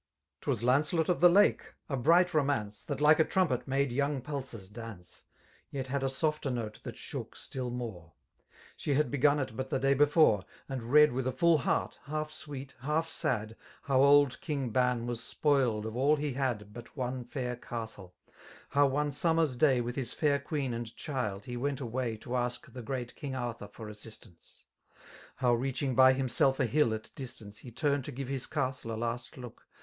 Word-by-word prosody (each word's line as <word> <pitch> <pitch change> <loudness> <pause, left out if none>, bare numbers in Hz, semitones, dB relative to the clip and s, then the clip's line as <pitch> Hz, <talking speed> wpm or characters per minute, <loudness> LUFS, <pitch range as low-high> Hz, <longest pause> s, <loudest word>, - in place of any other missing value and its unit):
Twas - - -1
Lamtcelot 155 +7 +2
of 180 - +1
the 175 - +9
Lake, 200 +4 +3
a 140 - -2
bright 170 +8 +4
romance^ 135 - 0
That 145 -1 -3
like 150 +1 +6
.a - - +7
trumpet^ 160 -10 0
made 135 0 +1
yomig 140 +1 0
pulses 130 -8 -6
daace^ 110 -6 -10 0.4
Yet 135 -2 -4
had 140 0 -1
a 135 - +1
softer 150 +1 -1
note 115 -4 -4
that - - -8
shook - - -6
stiU 125 -2 -5
more3 115 -8 -5
<^ 85 - -23 0.6
She 145 - -1
had 145 -4 +1
begun 145 +1 +4
it 130 -5 -3
but 130 +2 -4
the - - +1
day 135 +1 +3
before. 145 - +4 0.2
And 135 -2 -4
read 150 +1 +7
with 130 +1 -2
a - - +1
full 170 +2 +4
heart, - - -1
half 155 +1 -3
sweet> 140 -3 -8
half 150 +5 0
sad» 110 -7 -2 0.3
How 135 -2 +3
old 140 -1 +5
King 140 -6 -2
Ban 125 0 +1
was 120 -1 -3
spoiled 130 -9 +1
of 110 0 -5
all 140 +4 +4
he 145 -2 -2
had 120 -6 -2
But 120 +4 -11
one 125 0 -2
fair 125 -1 -4
castle: 110 -6 -7 0.5
how 145 0 +4
one 145 +2 0
summer's 160 -1 +2
day 130 -1 +4
With 120 +1 -4
his 130 -4 -2
fair 145 -2 +2
queen 140 -3 -2
and 115 0 -5
child 110 -9 -3
he 125 - -5
went 140 +2 -1
away 120 -2 -2
To 120 +3 -5
ask 120 0 -2
the 130 - -6
great 120 +1 -4
King 135 -2 -5
Arthur 120 -4 -4
for 110 +2 -10
assistance 105 -5 -13 0.4
> - - -23 0.3
How 125 -2 +2
reaching 130 +2 -1
by 130 +1 +7
himself 135 +1 +1
a 130 - +3
hill 140 -1 +2
at 110 0 -9
distance 110 -5 -8
He 125 - -10
turned 140 +3 0
to 150 - -5
^ve 135 +1 -5
his 135 0 -3
castle 130 -5 -2
a 110 - -3
last 120 +3 -4
look. 125 -3 -11
130 Hz, 195 wpm, -31 LUFS, 120-145 Hz, 0.6 s, the